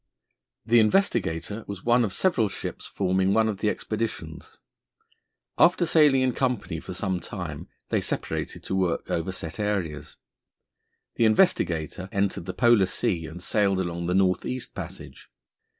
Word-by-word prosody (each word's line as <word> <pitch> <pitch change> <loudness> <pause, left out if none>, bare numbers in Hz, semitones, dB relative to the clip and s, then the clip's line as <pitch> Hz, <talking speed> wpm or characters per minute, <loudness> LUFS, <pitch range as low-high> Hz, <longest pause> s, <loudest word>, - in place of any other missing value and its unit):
The 120 +1 +5
Investigator 105 - +1
was 100 -2 -7
one 120 +1 +4
of 105 - -1
several 115 - +1
ships - - -6
forming 95 +1 +1
one 110 0 +4
of 105 -3 -3
the 105 - +1
expeditions. 105 -9 -5 1.0
After 175 0 +5
sailing 150 -5 +5
in 130 -1 +1
company 125 -11 -1
for 90 - -8
some 95 -1 -1
time - - -6 0.2
they - - +1
separated - - -3
to - - -4
work 90 -3 -1
over 85 +3 -1
set 85 0 -6
areas. 95 -8 -2 1.0
The 115 - +4
Investigator 90 - +2
entered 100 -3 -1
the 95 - -3
Polar 120 -5 +4
Sea 90 -7 -1
and 85 +3 -9
sailed 100 -3 +1
along 85 -1 -3
the 90 - +1
North 95 -1 +2
East 130 -1 -5
Passage. - - -9
100 Hz, 150 wpm, -26 LUFS, 90-115 Hz, 1.0 s, The